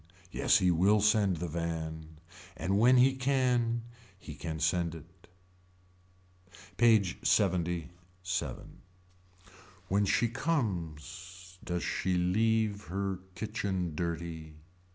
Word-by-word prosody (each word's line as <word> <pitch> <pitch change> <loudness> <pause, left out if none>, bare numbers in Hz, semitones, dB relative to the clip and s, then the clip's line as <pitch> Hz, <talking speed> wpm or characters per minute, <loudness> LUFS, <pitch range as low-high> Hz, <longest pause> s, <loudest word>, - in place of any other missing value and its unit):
Yes - - +3
he 90 -1 +3
will 95 +5 +4
send 105 -3 +3
the 85 +2 -3
van. 80 -1 -5 0.4
And 95 +2 0
when 125 +3 +6
he 130 +2 +5
can. 125 -3 +1 0.3
He 80 -5 -10
can 80 +2 -5
send 85 0 0
it. 85 +3 -15 1.5
PAGE 110 -6 +4
LXXVII. 90 - -2 1.1
When 100 +2 +2
she 105 +4 +2
comes 95 - -4
does 90 -2 -3
she 95 0 -1
leave 105 +3 +1
her 95 +1 -3 0.2
kitchen 95 -4 -3
dirty. 85 -1 -4
95 Hz, 100 wpm, -31 LUFS, 85-105 Hz, 1.5 s, when